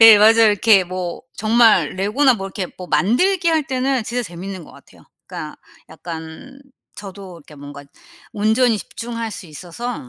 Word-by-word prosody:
예 225 -2 +9
맞아요. 225 +2 +6
이렇게 205 -1 +4
뭐 180 +1 -6
정말 220 -6 +3
레고나 225 +8 +2
뭐 195 -2 -6
이렇게 195 -1 -5
뭐 180 - -9
만들기 335 - +1
할 320 -2 +2
때는 260 -1 -1
진짜 240 +3 -3
재밌는 185 -1 -8
것 - - -16
같아요. - - -19 0.2
그러니까 - - -8 0.3
약간 165 +11 -10 0.4
저도 195 -3 -10
이렇게 150 -1 -16
뭔가 145 0 -11 0.5
온전히 220 +2 +2
집중할 230 +1 -6
수 195 - -9
있어서 175 - -7
210 Hz, 335 characters per minute, -19 LUFS, 180-240 Hz, 0.5 s, 예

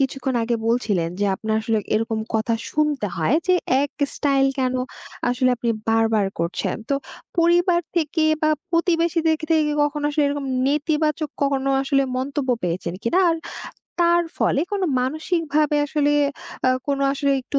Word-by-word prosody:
কিছুক্ষণ 270 -1 -1
আগে 235 0 0
বলছিলেন, 205 -8 +1
যে - - +2
আপনার 220 0 -2
আসলে 220 -1 +1 0.2
এরকম 225 0 0 0.2
কথা 225 +1 +1 0.2
শুনতে 300 -7 0
হয় 170 - +2
যে, 365 - +4 0.3
এক 285 - -2 0.2
স্টাইল 275 -2 +2
কেনো 255 -1 0 0.5
আসলে 250 +1 +2
আপনি 235 0 -1 0.2
বারবার, 225 -2 +2
করছেন। 170 +1 -2
তো 280 - +2 0.4
পরিবার 345 +1 +4 0.2
থেকে, 315 0 +1 0.2
বা 310 - +3 0.2
প্রতিবেশীদের 335 -1 +2
কে 310 - -5
থেকে 305 -2 +2
কখনো 295 0 -2
আসলে 295 0 +1
এরকম 285 -1 -3 0.2
নেতিবাচক 300 +1 0
কখনো 275 -1 +1
আসলে 275 0 +2
মন্তব্য 275 +1 -2
পেয়েছেন 170 0 -2
কিনা? 290 +11 +1
আর 330 - 0 0.6
তার 345 0 +4
ফলে 275 - +2
কোনো 390 -2 0 0.2
মানসিকভাবে 305 +2 0
আসলে 290 0 +1 0.6
আ - - +5 0.2
কোন 280 -1 0
আসলে 280 0 0
একটু 280 +2 -2
280 Hz, 150 wpm, -22 LUFS, 245-310 Hz, 0.6 s, আ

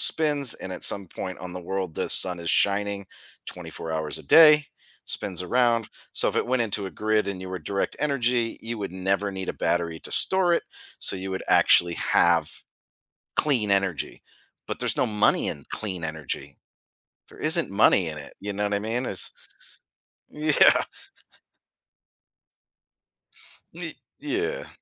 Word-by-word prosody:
spins, 145 -5 +1
and 95 - -7
at - - -5
some 100 -2 +1
point 95 +2 -6
on 90 -1 -8
the 90 -1 -8
world, 95 -4 -2
the - - -2
sun 90 -2 +3
is 85 - -4
shining 100 -1 +1 0.4
24 80 - -7
hours 80 -1 -2
a - - -11
day, 150 - +7 0.4
spins 90 -2 0
around, 115 +2 +2 0.2
so - - +3
if - - -3
it - - +1
went 125 -1 +1
into 105 -2 -2
a 95 - -6
grid 110 -1 +2
and 95 -2 -4
you 95 - -7
were 95 - -4
direct 100 0 -1
energy, 125 -5 0
you 115 0 -5
would 100 -3 -5
never 95 +2 0
need 95 0 -5
a - - 0
battery 85 -1 0
to - - -7
store 190 -2 +2
it, - - -2 0.4
so - - +1
you 95 +1 -5
would 95 - -3
actually 85 -1 +5
have 85 -3 +2 0.7
clean 120 -9 +1
energy, 95 -5 -1 0.5
but, - - -4
there's - - +1
no - - +3
money 105 -1 +2
in - - -6 0.2
clean 95 -5 -5
energy. 80 -3 -5 0.8
There - - -15
isn't 160 - 0
money 100 -3 +4
in 75 -1 -6
it, 75 - -11
you 100 +1 -4
know 105 +1 -2
what 105 0 0
I 100 - 0
mean? 115 +4 -2
It's - - -1 1.0
yeah. 150 -1 +4 2.9
Ye 165 -1 -7 0.2
yeah. 415 - -2
100 Hz, 160 wpm, -25 LUFS, 90-125 Hz, 2.9 s, day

